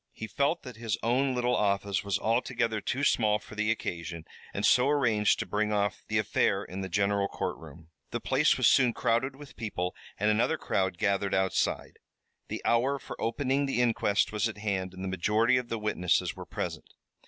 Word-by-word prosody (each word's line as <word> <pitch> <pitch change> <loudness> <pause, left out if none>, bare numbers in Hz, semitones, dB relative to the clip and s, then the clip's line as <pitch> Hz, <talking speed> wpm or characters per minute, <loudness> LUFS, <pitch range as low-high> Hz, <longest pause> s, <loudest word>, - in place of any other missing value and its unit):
He 110 - -6
felt 140 +9 0
that 125 -4 -9
his 115 -2 -2
own 130 +3 +1
little 125 0 +1
office 100 -1 0
was 100 -2 0
altogether 115 -1 0
too 135 +7 -2
small 110 -6 +3
for 105 - -14
the 105 +1 -1
occasion 85 -7 -3 0.3
and - - -2
so 125 +2 +5
arranged 115 -8 +3
to - - -3
bring 105 +1 -1
off 100 -2 0
the - - 0
affair - - +1
in 95 +3 -6
the 95 - -4
general 100 +1 +1
courtroom. 80 -4 -6 0.2
The - - -3
place - - +2
was - - +4
soon 125 -3 +4
crowded 120 +4 0
with 145 0 -13
people, 90 -5 -3 0.2
and 105 +1 +3
another 120 +9 +2
crowd 95 - -1
gathered 100 -1 +1
outside. 95 0 -1 0.5
The - - -5
hour 130 +4 +2
for - - -8
opening 135 +4 0
the 135 - -1
inquest 115 -4 +2
was 105 +1 0
at 110 - -8
hand 95 -3 -2
and 95 - -7
the - - -3
majority 105 +7 +2
of 125 -1 -3
the 115 - -2
witnesses 105 -5 0
were - - -9
present. - - -5
110 Hz, 190 wpm, -29 LUFS, 100-125 Hz, 0.5 s, so